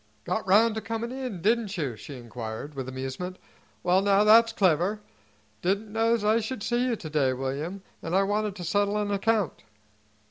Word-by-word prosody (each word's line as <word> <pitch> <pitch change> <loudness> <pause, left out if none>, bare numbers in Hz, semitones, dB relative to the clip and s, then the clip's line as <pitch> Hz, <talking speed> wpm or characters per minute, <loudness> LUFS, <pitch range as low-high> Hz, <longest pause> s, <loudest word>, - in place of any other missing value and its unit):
"Got 220 - -2
round 215 +4 +5
to 220 - -3
comin' 225 +2 -4
in, 255 -9 -5
didn't 220 -2 +1
you?" 140 -8 -2
she 135 +7 -9
inquired, 120 +3 -7
with 135 -2 -5
amusement. 135 +8 -5 0.5
"Well, 180 +1 +4
now, 200 0 +4
that's 230 +2 +7
clever. 190 0 +2 0.6
Didn't 205 +3 -1
know's 225 0 +2
I 215 +2 +4
should 225 -1 -4
see 240 +1 +1
you 240 - +1
to 175 - -8
day, 140 -4 +2
William, 140 +9 -4 0.2
an' 165 +2 -2
I 195 - +4
wanted 205 0 -1
to 180 - -7
settle 205 +4 +1
an 205 -1 -1
account." 205 -3 0
200 Hz, 180 wpm, -27 LUFS, 160-220 Hz, 0.6 s, that's